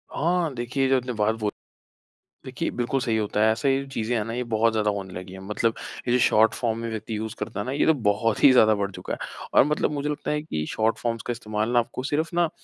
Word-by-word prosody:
हाँ 170 -1 +1
देखिए, 125 +3 -1
जो 135 - +4
आपने 125 0 -3
बात 110 0 +1
बोल 105 -1 -1 0.9
देखिए, - - -3
बिल्कुल 125 +2 -1
सही 115 -2 0
होता 105 -1 -1
है, 110 +1 +5
ऐसे 110 +5 0
ही 135 - -4
चीज़ 110 +1 -2
नहीं 115 +2 -1
बहुत 110 +1 +3
ज्यादा 105 -1 +1
होने 95 -2 -5
लगीं 90 +1 -8
हैं। 95 - -9
मतलब 110 +3 0 0.3
ये - - +2
जो 125 - +4
शॉर्ट 110 -2 +4
फॉर्म 115 -2 -1
में 115 0 -4
व्यक्ति 110 0 -4
यूज़ 110 +1 -5
करता 110 -2 -4
है 100 - -2
ना, 130 - -3
ये 140 - +1
तो 160 - +5
बहुत 110 -3 0
ही 140 - +9
ज़्यादा 110 -4 +6
बढ़ 100 -1 -2
चुका - - -6
है। - - -4 0.3
और - - +7
मतलब 150 +1 0
मुझे 145 0 -2
लगता 150 - -3
है 150 - 0
कि 75 - -3
शॉर्ट 110 +1 +1
फॉर्म्स 115 -2 -2
का - - 0
इस्तेमाल 110 -2 -2
ना 120 - +4
आपको 120 +2 -3
सिर्फ 155 +5 -1
ना 170 -1 +2
115 Hz, 250 wpm, -25 LUFS, 110-130 Hz, 0.9 s, ही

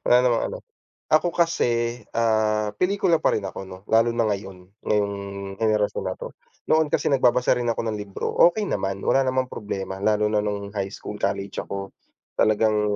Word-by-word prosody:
Wala 125 - +6
namang 120 -2 +2
ano. - - -5 0.5
Ako 155 +3 +4
kasi, 120 -8 +1 0.2
ah, 110 -2 +2
pelikula 185 -3 +2
pa - - +2
rin 105 - -2
ako 95 0 -6
'no, 95 -1 -9
lalo 115 +1 +4
na 115 - +2
ngayon, 95 -2 -6 0.2
ngayong 105 -1 +1 0.5
henerasyon 110 -2 +1
na - - -2
'to, - - -8 0.4
noon 160 -1 +4
kasi - - 0
nagbabasa 125 -2 +3
rin 120 - -2
ako 115 - 0
ng 110 -2 -2
libro, 100 -1 -4 0.2
okay 210 +5 -1
naman, 95 - -2
wala 135 -1 +3
namang 130 0 0
problema 95 -2 -5
lalo 105 +1 +2
na 105 - +2
no'ng 100 -1 -3
high 100 -2 -2
school, 105 - -7
college 100 0 -2
ako, 100 0 -5 0.5
talagang, 105 -1 +3
110 Hz, 175 wpm, -24 LUFS, 100-125 Hz, 0.5 s, Wala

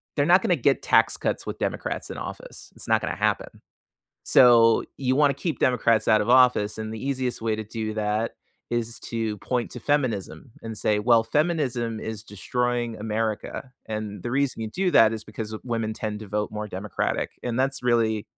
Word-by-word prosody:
They're - - +2
not - - +6
gonna - - +2
get - - +2
tax - - +3
cuts - - -2
with - - -6
Democrats - - -3
in - - -6
office. - - -8
It's - - -6
not - - +3
gonna - - -3
happen. - - -1 0.6
So, 115 -3 +6
you 130 -1 0
wanna 145 -2 +4
keep 160 +2 -3
Democrats 115 -3 +2
out 110 -1 +5
of 105 - -2
office, 125 -5 +4
and 110 0 -4
the 110 - -7
easiest 130 -2 -2
way 110 -1 0
to 110 - -5
do 110 0 -4
that 110 +1 -1 0.4
is 120 -1 -2
to 110 -2 -3
point 125 +3 -2
to 125 - -7
feminism 115 - -1
and 115 -1 -6
say, 105 -1 +1
"Well, 115 0 +4
feminism 135 -8 0
is 110 -1 -5
destroying 120 +2 -2
America." 110 +4 -3
and 105 -3 -5
the 120 - -4
reason 135 -2 0
you 110 - -3
do 185 - 0
that 110 0 +6
is 110 -1 -5
because 110 0 -6
women 115 -3 -2
tend 105 -1 -4
to 110 - -9
vote 105 +1 -2
more 105 0 -4
democratic, 100 +2 -2
and 120 0 -2
that's 135 -1 0
really 115 -3 +1
115 Hz, 190 wpm, -25 LUFS, 110-125 Hz, 0.6 s, not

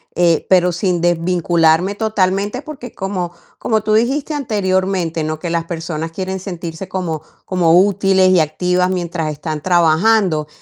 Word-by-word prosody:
eh, 170 -2 +2
pero 180 -1 +4
sin 175 0 -1
desvincularme 175 +1 +2
totalmente, 205 +1 0
porque 280 -6 -9
como 190 -3 -3 0.3
como 220 -2 0
tú 215 0 0
dijiste 270 +7 +1
anteriormente, 190 - -1
¿no?, 155 0 -3
que 175 - -4
las 165 -1 -1
personas 165 -1 -5
quieren 190 +2 -4
sentirse 175 -1 -7
como 170 -5 -3 0.2
como 175 -2 +3
útiles 195 -1 +3
y 185 - +4
activas 180 +4 +1
mientras 170 -4 -2
están 150 +1 -5
trabajando, 175 0 +2
180 Hz, 140 wpm, -17 LUFS, 165-195 Hz, 0.3 s, pero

